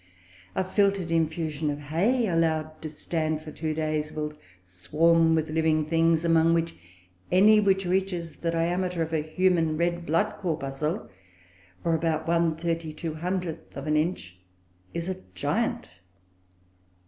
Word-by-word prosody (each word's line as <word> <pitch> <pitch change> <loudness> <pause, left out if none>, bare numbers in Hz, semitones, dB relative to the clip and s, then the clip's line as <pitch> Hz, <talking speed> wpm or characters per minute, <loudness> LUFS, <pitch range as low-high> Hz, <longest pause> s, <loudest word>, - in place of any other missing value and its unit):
A - - +1
filtered 195 -2 +1
infusion 160 -2 0
of 145 - -2
hay, 180 - +1
allowed 160 -3 0
to 155 - -5
stand 155 0 -2
for 155 - -8
two 155 0 -3
days, 155 -1 -1
will 150 0 -4 0.3
swarm 160 - +3
with 155 -1 -1
living 155 -1 +2
things 165 +1 +2
among 165 0 +4
which, 165 0 0 0.6
any 210 +4 +6
which 195 -2 +2
reaches 180 -3 -1
the 170 - -2
diameter 175 +1 0
of 160 0 -5
a 155 - +2
human 165 0 +1
red 170 +1 0
blood 165 +7 +1
corpuscle, 155 +1 -2 0.8
or 165 - +1
about 160 -1 0
1/3200th 165 +1 -2
of - - -5
an 150 0 +1
inch, 150 - -1 0.5
is 170 +1 -4
a 190 - -2 0.2
giant. 90 - -1
165 Hz, 135 wpm, -27 LUFS, 155-175 Hz, 0.8 s, any